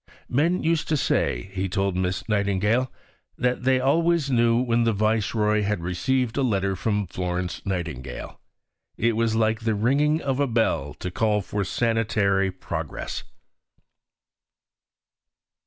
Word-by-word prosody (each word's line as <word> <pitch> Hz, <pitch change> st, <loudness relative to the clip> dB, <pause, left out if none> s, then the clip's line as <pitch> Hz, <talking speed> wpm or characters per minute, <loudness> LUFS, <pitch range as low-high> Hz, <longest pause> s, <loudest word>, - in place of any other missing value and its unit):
"Men 165 Hz, +8 st, +1 dB
used 165 Hz, -1 st, +1 dB
to 155 Hz, -, +1 dB
say," 95 Hz, -, 0 dB
he 95 Hz, 0 st, -2 dB
told 95 Hz, 0 st, 0 dB
Miss 90 Hz, +2 st, -2 dB
Nightingale, 105 Hz, +4 st, +1 dB, 0.5 s
"that 125 Hz, 0 st, 0 dB
they 130 Hz, 0 st, +4 dB
always 160 Hz, +2 st, +2 dB
knew 115 Hz, -1 st, +3 dB
when 120 Hz, -2 st, +2 dB
the 115 Hz, -1 st, +2 dB
Viceroy 105 Hz, 0 st, +1 dB
had 105 Hz, -4 st, -1 dB
received 115 Hz, +9 st, 0 dB
a -, -, +2 dB
letter 100 Hz, -6 st, +1 dB
from 105 Hz, +1 st, -1 dB
Florence 90 Hz, 0 st, -3 dB
Nightingale: 80 Hz, -10 st, -5 dB, 0.6 s
it 115 Hz, 0 st, +1 dB
was 115 Hz, 0 st, +1 dB
like 110 Hz, 0 st, +2 dB
the 110 Hz, -2 st, 0 dB
ringing 140 Hz, +8 st, +2 dB
of 135 Hz, -4 st, -2 dB
a 140 Hz, -, +2 dB
bell 110 Hz, -, 0 dB
to 90 Hz, -, -5 dB
call 105 Hz, +1 st, +1 dB
for 100 Hz, +2 st, -2 dB
sanitary 105 Hz, -3 st, +1 dB
progress." 95 Hz, -, -5 dB
110 Hz, 135 wpm, -25 LUFS, 95-125 Hz, 0.6 s, they